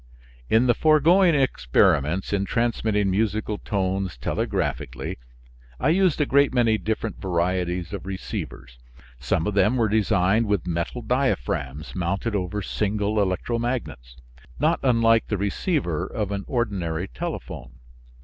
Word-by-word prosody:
In 115 +3 +4
the 120 - +4
foregoing 160 +5 +4
experiments 85 - +2
in 100 -1 +1
transmitting 110 -3 0
musical 105 +1 -1
tones 95 - -2
telegraphically, - - -3 0.6
I 135 - +2
used 180 -1 +3
a 150 - +3
great 140 +1 +3
many 115 -3 +3
different 110 0 -3
varieties 90 0 -1
of 100 -1 -6
receivers. 65 - -6 0.4
Some 65 +5 0
of 105 - -1
them 105 +4 +3
were 115 -2 +2
designed 105 0 +2
with 100 -5 0
metal 85 +8 -3
diaphragms 80 - -1
mounted 95 +5 -1
over 100 +1 -2
single 105 +1 -1
electromagnets, 95 - -2 0.4
not 155 +4 +2
unlike 115 -3 +3
the 105 - -1
receiver 100 - -1
of 105 -2 -3
an 100 0 -3
ordinary 95 - -2
telephone. 60 -8 -6
100 Hz, 125 wpm, -24 LUFS, 90-115 Hz, 0.6 s, In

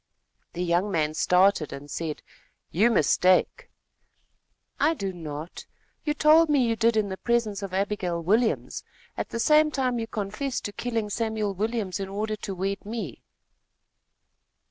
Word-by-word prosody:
The 175 - -3
young 175 +3 +1
man 155 -5 0
started 180 0 +3
and 140 +1 -8
said: 160 -3 -4 0.5
"You 210 +8 +4
mistake." 185 - +2 1.1
"I 315 +3 +3
do 195 -8 -4
not. 155 -1 -7 0.4
You 300 -1 0
told 310 +2 +5
me 280 -4 +3
you 230 - +1
did 230 0 +2
in 210 -2 +1
the 190 - -5
presence 225 -4 0
of 195 -2 -5
Abigail 190 -3 -1
Williams. 215 +8 0 0.3
At - - -4
the 230 - -4
same 305 +4 +5
time 255 -4 -1
you 225 - -3
confessed 220 +6 -3
to 205 - -4
killing 225 -2 -3
Samuel 220 -2 -1
Williams 210 -1 -2
in 195 -1 -4
order 215 +2 -2
to 195 -2 -5
wed 195 +2 -3
me." 210 - -6
205 Hz, 150 wpm, -26 LUFS, 185-235 Hz, 1.1 s, told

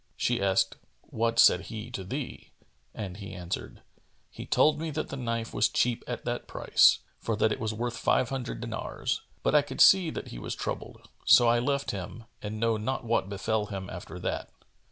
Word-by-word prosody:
She 120 -3 0
asked, 95 -1 +2 0.3
"What 115 +1 -1
said 95 -4 +6
he 110 +2 -6
to 95 - -5
thee?"; 130 +8 -6 0.4
and 95 -3 -6
he 100 -2 -8
answered, 90 -1 -6 0.5
"He - - -9
told 150 0 +4
me 160 0 -3
that 155 +1 -3
the - - -5
knife 115 -3 -3
was 105 - +3
cheap 120 -1 +1
at - - -5
that - - -3
price, - - +4 0.2
for 115 - -1
that 110 +1 +2
it - - -2
was 110 -1 -1
worth 120 +2 -3
five 125 - +2
hundred 130 -4 -4
dinars: 115 -1 -3 0.2
but - - +2
I 150 - +7
could 140 -2 -8
see 190 -4 +7
that - - -6
he - - -7
was - - -4
troubled; - - -6 0.2
so 120 - +7
I 120 0 +4
left 140 +3 0
him 100 +4 -6 0.2
and 110 +1 -5
know 115 -1 +2
not 120 +4 -3
what 115 -4 +1
befel 105 +1 -1
him 95 -2 -6
after 90 -1 -8
that." 90 - -3
115 Hz, 195 wpm, -28 LUFS, 100-125 Hz, 0.5 s, I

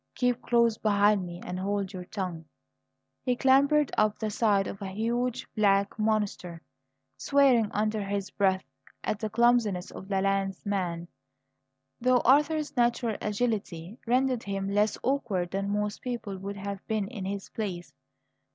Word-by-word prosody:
"Keep 245 -1 +1
close 235 -2 +2
behind 205 -2 +3
me 175 0 -8
and 180 - -4
hold 200 0 -2
your 180 -1 -6
tongue." 180 -5 -5 0.8
He 250 -1 0
clambered 280 +3 +4
up 215 0 +2
the 215 -1 -3
side 205 -2 +2
of 195 - -7
a 195 - -4
huge 235 +5 -1
black 200 0 +2
monster, 205 -6 -1 0.5
swearing 265 -6 +4
under 215 0 0
his 200 0 -3
breath 190 -2 +1 0.4
at 215 - -2
the 215 - -2
clumsiness 225 -5 +2
of 190 - -9
the 195 -1 0
landsman, 195 -3 -1 0.9
though 250 0 +3
Arthur's 295 +2 +3
natural 240 -2 +1
agility 210 -3 -2
rendered 255 0 +2
him 195 -1 -3
less 210 +1 +2
awkward 215 -10 -1
than 195 +1 -2
most 210 +1 -2
people 235 -5 -4
would 200 +2 -6
have 200 0 -5
been 215 -3 -1
in 205 -4 -6
his 195 0 -4
place. 175 -8 -5
210 Hz, 145 wpm, -28 LUFS, 195-235 Hz, 0.9 s, clambered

